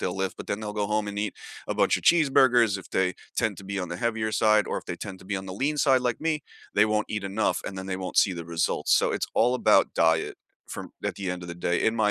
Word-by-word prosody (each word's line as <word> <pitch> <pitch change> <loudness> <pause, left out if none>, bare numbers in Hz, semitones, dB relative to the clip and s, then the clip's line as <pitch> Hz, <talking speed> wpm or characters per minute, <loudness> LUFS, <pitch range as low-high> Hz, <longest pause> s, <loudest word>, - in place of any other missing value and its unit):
they'll 90 - -2
lift, 95 0 -2
but - - -8
then 100 - -3
they'll 105 -1 -5
go 105 -1 -1
home 105 0 -1
and 100 - -5
eat 105 0 -2 0.3
a - - -1
bunch - - +3
of - - -7
cheeseburgers 130 - +4
if 95 - -13
they 90 -1 +1 0.2
tend - - 0
to 100 - -10
be 100 +1 -4
on 90 -2 -3
the 85 - -5
heavier 110 0 -1
side, 105 -2 +3
or - - -2
if - - -12
they - - -4
tend 95 -2 -7
to - - -14
be 100 +1 -3
on 95 0 -6
the 95 - -6
lean 145 +8 -1
side 135 -3 +4
like 125 -2 -1
me, 155 -2 -1 0.3
they 105 - +5
won't 105 0 0
eat 105 -2 -3
enough 100 +3 0
and 95 - -6
then 95 - -6
they 95 -1 -2
won't 95 -1 -6
see 95 - +5
the 85 -1 -6
results, 85 0 +1
so - - +1
it's - - -1
all 120 +2 +3
about 125 - +3
diet 80 -1 +2 0.3
from - - -7
at - - -1
the 95 -2 -3
end 90 0 -4
of 85 - -8
the 85 - -5
day, 85 0 -1
in 110 - +2
my 105 -1 +3
105 Hz, 295 wpm, -26 LUFS, 95-110 Hz, 0.3 s, they